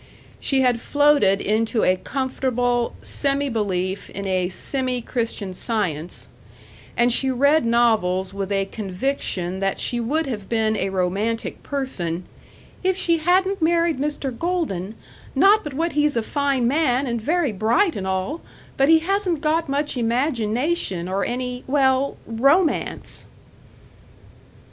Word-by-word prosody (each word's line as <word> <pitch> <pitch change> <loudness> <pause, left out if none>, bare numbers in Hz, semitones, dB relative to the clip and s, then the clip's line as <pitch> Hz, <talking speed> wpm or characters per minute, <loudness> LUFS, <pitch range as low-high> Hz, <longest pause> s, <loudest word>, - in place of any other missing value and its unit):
She 270 -1 +1
had 245 -3 +2
floated 285 -9 +3
into 220 +2 +1
a 185 - +4
comfortable 245 +1 -1
semi 280 0 0
belief 190 -4 -2
in 200 +1 -6
a 185 -2 0
semi 255 +5 -2
Christian 225 -5 -3
Science, 180 -6 -2 0.7
and 240 0 +4
she 265 +2 +1
read 280 +2 +3
novels 215 -6 +2
with 200 0 -4
a 195 -1 +1
conviction 190 -3 -3
that 195 0 -1
she 240 - -1
would 295 +8 0
have 215 -7 -5
been 220 -1 +1
a 195 -2 -1
romantic 195 +5 -2
person 185 - -3 0.6
"if 375 0 +1
she 335 -3 +1
hadn't 375 +3 +2
married 335 -2 +2
Mr. 280 -3 -2
Golden 230 - -2 0.4
not 415 +2 +5
but 295 -3 -6
what 330 +3 0
he's 295 -3 +1
a 230 - +1
fine 275 -2 0
man 275 -1 +2
and 235 -3 -2
very 315 +1 +1
bright 230 - +2
and 190 -1 -4
all, 190 - -2 0.4
but 275 +2 +3
he 320 0 +6
hasn't 365 -3 0
got 315 0 +1
much 285 0 -1
imagination 235 - 0
or 195 +2 -1
any, 250 0 -3
well, 265 0 +2
romance!" 275 +10 +1
245 Hz, 135 wpm, -22 LUFS, 200-295 Hz, 0.7 s, he